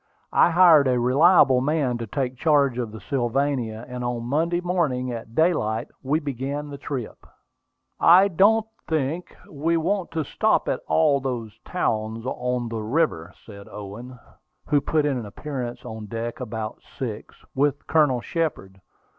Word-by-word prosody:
I -, -, +5 dB
hired 165 Hz, -5 st, +6 dB
a 125 Hz, -1 st, +2 dB
reliable 135 Hz, +1 st, +5 dB
man 135 Hz, -4 st, 0 dB
to 115 Hz, -, -5 dB
take 130 Hz, +2 st, -2 dB
charge 140 Hz, -3 st, +2 dB
of 115 Hz, -3 st, -3 dB
the 110 Hz, -, -9 dB
Sylvania, 125 Hz, -3 st, -1 dB
and 125 Hz, -1 st, -6 dB
on 120 Hz, -1 st, -2 dB
Monday 160 Hz, +7 st, 0 dB
morning, 160 Hz, -9 st, -1 dB
at 115 Hz, -1 st, -8 dB
daylight, 120 Hz, -10 st, +1 dB
we 145 Hz, +4 st, 0 dB
began 145 Hz, +1 st, -4 dB
the 140 Hz, -, -8 dB
trip. 130 Hz, -6 st, -6 dB, 0.8 s
"I 180 Hz, +4 st, +7 dB
don't 205 Hz, +4 st, +3 dB, 0.2 s
think 160 Hz, +2 st, -2 dB
we 160 Hz, +3 st, 0 dB
want 185 Hz, +3 st, -1 dB
to 160 Hz, -1 st, -1 dB
stop -, -, +1 dB
at -, -, 0 dB
all 80 Hz, -, +3 dB
these 120 Hz, -5 st, -5 dB
towns 110 Hz, +2 st, -2 dB
on 125 Hz, -2 st, -2 dB
the 115 Hz, -1 st, -4 dB
river," 110 Hz, -, 0 dB
said 100 Hz, -2 st, -12 dB
Owen, 110 Hz, +5 st, -9 dB, 0.5 s
who 145 Hz, -1 st, +2 dB
put 150 Hz, +1 st, +1 dB
in 140 Hz, -4 st, 0 dB
an 115 Hz, -, -6 dB
appearance 125 Hz, +1 st, -6 dB
on 110 Hz, -1 st, -7 dB
deck 115 Hz, +2 st, -5 dB
about 110 Hz, -3 st, -5 dB, 0.2 s
six, 115 Hz, -5 st, -5 dB, 0.2 s
with 140 Hz, +1 st, 0 dB
Colonel 145 Hz, -6 st, +2 dB
Shepard. 105 Hz, -, -3 dB
130 Hz, 155 wpm, -24 LUFS, 115-155 Hz, 0.8 s, I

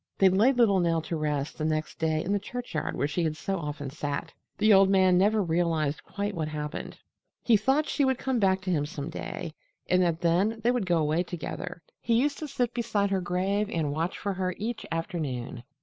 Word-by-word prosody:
They 195 Hz, -, +6 dB
laid 225 Hz, +8 st, +3 dB
little 210 Hz, -6 st, +5 dB
Nell 165 Hz, -2 st, +2 dB
to 165 Hz, -, -3 dB
rest 150 Hz, -2 st, -2 dB
the -, -, -1 dB
next 155 Hz, 0 st, -2 dB
day 160 Hz, -1 st, +1 dB
in 195 Hz, -, -1 dB
the 205 Hz, -, +2 dB
churchyard 240 Hz, -7 st, -4 dB
where 140 Hz, -, 0 dB
she 170 Hz, +4 st, -1 dB
had 155 Hz, -1 st, -1 dB
so 195 Hz, +2 st, -2 dB
often 145 Hz, -3 st, -5 dB
sat. 145 Hz, -1 st, -4 dB, 0.2 s
The 215 Hz, 0 st, +5 dB
old 195 Hz, 0 st, +6 dB
man 190 Hz, -2 st, +5 dB
never 205 Hz, +3 st, +3 dB
realized 160 Hz, -3 st, 0 dB
quite 205 Hz, +1 st, -3 dB
what 160 Hz, -4 st, -2 dB
had 155 Hz, 0 st, -5 dB
happened. 150 Hz, +1 st, -5 dB, 0.5 s
He 235 Hz, -, +5 dB
thought 265 Hz, +8 st, +2 dB
she 290 Hz, -, +1 dB
would 265 Hz, -2 st, +2 dB
come 260 Hz, -2 st, -1 dB
back 190 Hz, -2 st, +3 dB
to 185 Hz, 0 st, -2 dB
him 145 Hz, -4 st, +1 dB
some 150 Hz, +1 st, -6 dB
day, 160 Hz, -, -5 dB, 0.3 s
and 185 Hz, 0 st, +3 dB
that 170 Hz, -2 st, +1 dB
then 185 Hz, +6 st, +2 dB
they 240 Hz, -, +4 dB
would 245 Hz, -6 st, -1 dB
go 175 Hz, -1 st, +3 dB
away 155 Hz, +2 st, +1 dB
together. 175 Hz, 0 st, -6 dB, 0.2 s
He 230 Hz, -, +1 dB
used 285 Hz, +2 st, 0 dB
to 310 Hz, -, -4 dB
sit 245 Hz, -3 st, -1 dB
beside 220 Hz, -4 st, 0 dB
her 190 Hz, -1 st, +1 dB
grave 190 Hz, +4 st, 0 dB
and 155 Hz, -4 st, -1 dB
watch 165 Hz, +4 st, -2 dB
for 200 Hz, -, -2 dB
her 185 Hz, -1 st, -2 dB
each 225 Hz, +3 st, -4 dB
afternoon. 150 Hz, -, -3 dB
180 Hz, 220 wpm, -28 LUFS, 155-205 Hz, 0.5 s, They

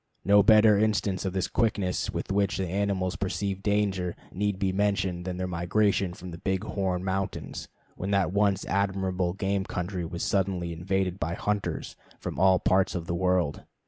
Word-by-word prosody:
No 100 Hz, +1 st, +7 dB
better 105 Hz, 0 st, +6 dB
instance 105 Hz, -3 st, +1 dB
of 95 Hz, -, -2 dB
the 95 Hz, -2 st, 0 dB
quickness 100 Hz, -5 st, 0 dB
with -, -, -4 dB
which 100 Hz, 0 st, +1 dB
animals 95 Hz, 0 st, -1 dB
perceive 95 Hz, +1 st, -2 dB
danger 100 Hz, -4 st, 0 dB, 0.2 s
need 100 Hz, 0 st, -1 dB
be 95 Hz, -1 st, 0 dB
mentioned 95 Hz, -3 st, 0 dB
than 90 Hz, -1 st, -3 dB
their 95 Hz, -, -2 dB
migration 90 Hz, +1 st, +1 dB
from 90 Hz, 0 st, -9 dB
the 85 Hz, -, -8 dB
Big 95 Hz, +1 st, -1 dB
Horn 95 Hz, -3 st, -2 dB
Mountains, 95 Hz, 0 st, -3 dB, 0.3 s
when 95 Hz, -, -4 dB
that 100 Hz, -2 st, +1 dB
once 100 Hz, -1 st, +2 dB
admirable 95 Hz, -2 st, 0 dB
game 100 Hz, 0 st, -1 dB
country 90 Hz, -1 st, -3 dB
was 85 Hz, +1 st, -4 dB
suddenly 95 Hz, -3 st, 0 dB
invaded 95 Hz, +2 st, -1 dB
by 80 Hz, +3 st, -2 dB
hunters 105 Hz, 0 st, -2 dB, 0.2 s
from -, -, -5 dB
all 95 Hz, 0 st, +5 dB
parts 95 Hz, +2 st, +2 dB
of 85 Hz, -2 st, -3 dB
the 85 Hz, -, -3 dB
world. 90 Hz, -4 st, +1 dB
95 Hz, 170 wpm, -27 LUFS, 90-100 Hz, 0.3 s, No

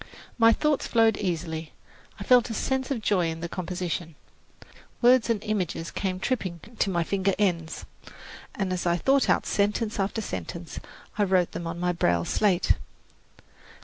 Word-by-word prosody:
My 230 Hz, 0 st, +7 dB
thoughts 300 Hz, +4 st, +1 dB
flowed 225 Hz, -2 st, +4 dB
easily; 165 Hz, -4 st, -3 dB, 0.5 s
I -, -, -5 dB
felt 250 Hz, -1 st, +5 dB
a 225 Hz, -, -3 dB
sense 265 Hz, +2 st, -1 dB
of 245 Hz, -6 st, -2 dB
joy 185 Hz, -5 st, +2 dB
in 165 Hz, 0 st, -5 dB
the 170 Hz, -, -3 dB
composition. 175 Hz, -2 st, -4 dB, 0.8 s
Words 245 Hz, -1 st, +5 dB
and 220 Hz, -3 st, 0 dB
images 180 Hz, -6 st, -2 dB
came 185 Hz, -2 st, -2 dB
tripping 185 Hz, -6 st, -2 dB, 0.2 s
to 200 Hz, -, +2 dB
my 175 Hz, -3 st, +1 dB
finger 195 Hz, +2 st, 0 dB
ends, 175 Hz, -6 st, -1 dB, 0.7 s
and 195 Hz, -3 st, -1 dB
as 180 Hz, -1 st, -2 dB
I 170 Hz, 0 st, +2 dB
thought 270 Hz, +7 st, +2 dB
out -, -, +3 dB
sentence 210 Hz, +2 st, 0 dB
after 195 Hz, +3 st, -1 dB
sentence, 165 Hz, -, -6 dB, 0.4 s
I -, -, +5 dB
wrote 185 Hz, -3 st, +2 dB
them 170 Hz, -, -5 dB
on 165 Hz, +1 st, -5 dB
my 180 Hz, 0 st, +1 dB
braille 85 Hz, -, +1 dB
slate. 195 Hz, -4 st, +2 dB
185 Hz, 160 wpm, -26 LUFS, 170-220 Hz, 0.8 s, My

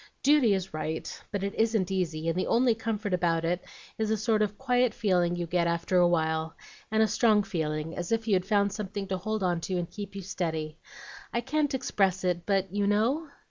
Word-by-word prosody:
Duty 275 Hz, -7 st, +5 dB
is 190 Hz, -2 st, -4 dB
right, 155 Hz, +1 st, -4 dB
but 200 Hz, -2 st, -2 dB
it 200 Hz, +1 st, -2 dB
isn't 220 Hz, -5 st, +1 dB
easy, 165 Hz, -4 st, -1 dB
and 165 Hz, -, +1 dB
the 185 Hz, -, -1 dB
only 240 Hz, 0 st, +4 dB
comfort 215 Hz, -3 st, -3 dB
about 170 Hz, -2 st, +1 dB
it 175 Hz, +2 st, -1 dB, 0.4 s
is 220 Hz, -1 st, 0 dB
a 220 Hz, -, +2 dB
sort 215 Hz, 0 st, +1 dB
of 205 Hz, -1 st, 0 dB
quiet 250 Hz, -3 st, +1 dB
feeling 180 Hz, -5 st, +2 dB
you 175 Hz, 0 st, -2 dB
get 170 Hz, 0 st, +1 dB
after 170 Hz, +2 st, 0 dB
a 175 Hz, -1 st, +6 dB
while, 160 Hz, -1 st, 0 dB, 0.3 s
and 220 Hz, 0 st, +3 dB
a -, -, +3 dB
strong 215 Hz, -1 st, +3 dB
feeling, 160 Hz, -3 st, -3 dB
as 175 Hz, +3 st, -4 dB
if 225 Hz, 0 st, 0 dB
you'd 190 Hz, -4 st, +3 dB
found 200 Hz, 0 st, +2 dB
something 205 Hz, -1 st, -4 dB
to 190 Hz, -, 0 dB
hold 215 Hz, +1 st, -2 dB
on 175 Hz, -2 st, +1 dB
to 185 Hz, -, -3 dB
and 175 Hz, -1 st, -3 dB
keep 205 Hz, -1 st, -7 dB
you 195 Hz, -, -5 dB
steady. 160 Hz, -4 st, -3 dB, 0.5 s
I 235 Hz, -, 0 dB
can't 290 Hz, +2 st, 0 dB
express 195 Hz, -7 st, 0 dB
it, 175 Hz, -1 st, -1 dB
but 195 Hz, -2 st, +1 dB
you 205 Hz, 0 st, +1 dB
know?" 245 Hz, +10 st, +1 dB
195 Hz, 215 wpm, -28 LUFS, 175-220 Hz, 0.5 s, a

